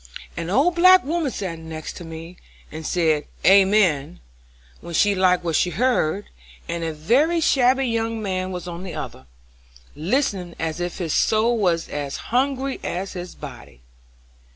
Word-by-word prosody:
An 165 0 -4
old 280 - +3
black 370 +2 +7
woman 320 0 -1
sat 185 -8 -5
next 160 +2 -7
me, 165 +1 -9 0.4
and 160 0 -6
said 160 -4 +1 0.2
'Amen' 190 - +4 0.6
when 170 -1 -7
she 205 +4 +4
liked 185 -2 +2
what 165 -2 -1
she 180 - +2
heard, 205 -4 0 0.4
and 170 0 -3
a 165 - -1
very 255 - +2
shabby 265 -3 +3
young 230 -1 -1
man 185 -3 -2
was 180 -1 -6
on 170 0 -6
the 185 -2 -7
other, 65 - -7 0.7
listening 180 - -1
as 165 0 -3
if 175 0 -3
his 170 -5 -2
soul 225 +2 +2
was 175 -6 +1
as 145 -1 -4 0.2
hungry 270 +1 0
as 185 +3 -4
his 180 -1 -7
body. 120 - -11
185 Hz, 155 wpm, -22 LUFS, 165-235 Hz, 0.7 s, black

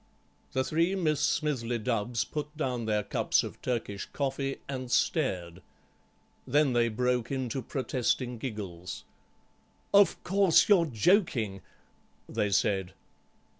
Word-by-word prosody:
The 130 - +1
three 165 +7 +1
Miss 155 -6 +1
Smithly 130 -6 0
Dubbs 115 0 -1
put 150 0 -6
down 125 -6 -2
their 105 -1 +1
cups - - +1
of - - -8
Turkish 110 -5 -3
coffee 135 -1 -2
and 130 -2 -5
stared. 95 - 0 0.9
Then 145 0 +3
they 120 -1 +3
broke 125 +1 0
into 130 -1 -2
protesting 125 -2 -1
giggles. 95 -8 -6 0.9
"Of 200 -1 +5
course, 195 -2 +4
you're 185 -5 +5
joking," 115 - +1 0.7
they 105 - -1
said. 95 -2 +1
125 Hz, 115 wpm, -29 LUFS, 110-150 Hz, 0.9 s, Of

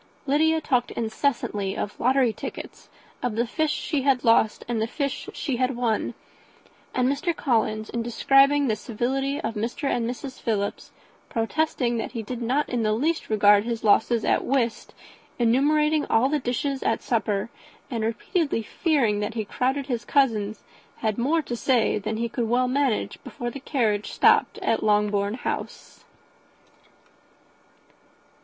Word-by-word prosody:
Lydia 315 +3 +3
talked 250 -5 0
incessantly 220 -4 -2
of 210 - -4
lottery 255 -1 +3
tickets, 215 - -8 0.3
of 245 -4 -2
the 235 +2 +1
fish 310 +6 -1
she 300 -3 -1
had 265 -2 +2
lost 230 -2 +3
and 235 -2 -1
the 220 - 0
fish 280 +2 -3
she 270 -5 -3
had 255 +1 0
won; 235 -3 -1 0.8
and 255 -1 +2
Mr. 320 +6 0
Collins, 220 -6 0
in 235 - -2
describing 275 +4 +4
the 220 - +1
civility 265 +6 -2
of 225 - -3
Mr. 230 +6 -4
and 240 -3 0
Mrs. 255 +1 -7
Philips, 205 -4 -2 0.4
protesting 240 0 0
that 225 - -4
he 230 -3 -4
did 245 +3 -6
not 260 +6 0
in 245 -2 -1
the 215 -1 +1
least 310 +9 -1
regard 205 -1 +5
his 235 0 -4
losses 220 +2 +3
at - - +2
whist, 245 -4 -1 0.4
enumerating 295 +6 +2
all 240 +4 +3
the 300 0 +1
dishes 270 +2 -2
at - - 0
supper, 220 -2 -1 0.4
and 230 -3 -2
repeatedly 230 - -1
fearing 240 -6 +1
that 210 +2 -3
he 220 -2 -2
crowded 265 +6 -1
his 245 -4 -3
cousins, 220 -7 +1 0.3
had 220 -1 -1
more 310 +6 +1
to 240 - -4
say 240 -3 +2
than 215 +2 -3
he 235 +1 -1
could 230 -1 -2
well 250 +2 +2
manage 265 -3 -1
before 240 0 -5
the 280 - -7
carriage 225 -7 -1
stopped - - +4
at 225 - +1
Longbourn 210 -1 +1
House. 250 - -6
240 Hz, 155 wpm, -25 LUFS, 220-275 Hz, 0.8 s, regard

